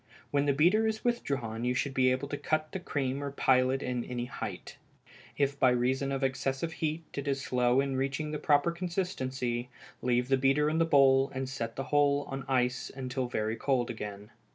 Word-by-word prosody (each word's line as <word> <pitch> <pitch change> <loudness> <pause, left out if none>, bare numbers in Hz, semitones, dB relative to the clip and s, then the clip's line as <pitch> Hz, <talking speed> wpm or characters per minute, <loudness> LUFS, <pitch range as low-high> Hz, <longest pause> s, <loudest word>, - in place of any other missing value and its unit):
When 145 0 +1
the - - +5
beater 180 +10 +4
is 220 +1 -3
withdrawn 135 - -1
you 125 +1 +1
should 140 +2 -1
be 130 -1 +3
able 130 +2 -1
to 145 - -2
cut 155 +1 -1
the 190 - -4
cream 140 -5 -2
or 140 - -2
pile 130 -2 +3
it 135 +1 -1
any 125 -1 -3
height. - - -7 0.6
If 140 0 0
by 130 - +5
reason 130 +3 +1
of 135 0 -2
excessive 135 +4 -1
heat 160 +1 -2
it 140 0 -4
is 135 -1 0
slow 125 0 +2
in 140 -1 -2
reaching 135 +3 -2
the 150 - -3
proper 145 +2 +3
consistency, 135 -9 -3 0.3
leave 125 0 +1
the 135 - +4
beater 135 +3 +3
in 160 - 0
the 165 - +4
bowl, 135 -3 +5
and 130 0 -2
set 115 -4 -4
the 135 - -3
whole 145 0 +2
on 135 -1 -5
the 135 0 -8
ice 125 -1 0
until 130 -1 -3
very 110 -2 -1
cold 125 -2 0
again. 105 -2 -7
135 Hz, 200 wpm, -30 LUFS, 125-145 Hz, 0.6 s, the